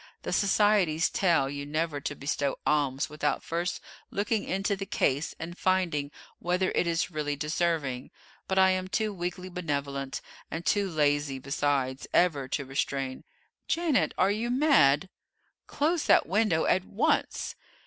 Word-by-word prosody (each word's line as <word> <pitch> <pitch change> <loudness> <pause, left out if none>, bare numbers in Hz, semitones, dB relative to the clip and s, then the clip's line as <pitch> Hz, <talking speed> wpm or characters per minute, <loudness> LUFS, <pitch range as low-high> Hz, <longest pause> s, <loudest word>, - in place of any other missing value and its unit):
The - - -3
societies 200 -6 +3
tell 170 -8 +2
you 140 +1 -5
never 150 0 -2
to 145 - -4
bestow 140 0 -2
alms 140 -2 +1
without 150 -2 -2
first 170 +1 -2 0.3
looking 205 +2 -1
into 195 +2 0
the 195 0 -6
case 140 0 0
and 165 +2 -6
finding 180 -7 0 0.3
whether 180 +2 0
it 175 - +1
is 165 +1 0
really 150 -2 -2
deserving; 150 -4 -1 0.4
but 190 - -1
I 190 0 +6
am 185 0 -1
too 215 +2 -1
weakly 180 0 -4
benevolent, 140 -6 -3 0.3
and 165 +2 -5
too 200 -2 +2
lazy, 145 -3 +1
besides, 135 -1 -1
ever 150 -7 +3
to 140 +2 -2
restrain 135 -1 -3 0.4
Janet, 325 -5 +1
are 190 - +3
you 225 +3 -2
mad? 190 - +4 0.6
Close 315 +2 0
that - - +5
window 190 -3 +2
at 185 0 +2
once!" 200 +3 0
165 Hz, 145 wpm, -28 LUFS, 145-190 Hz, 0.6 s, I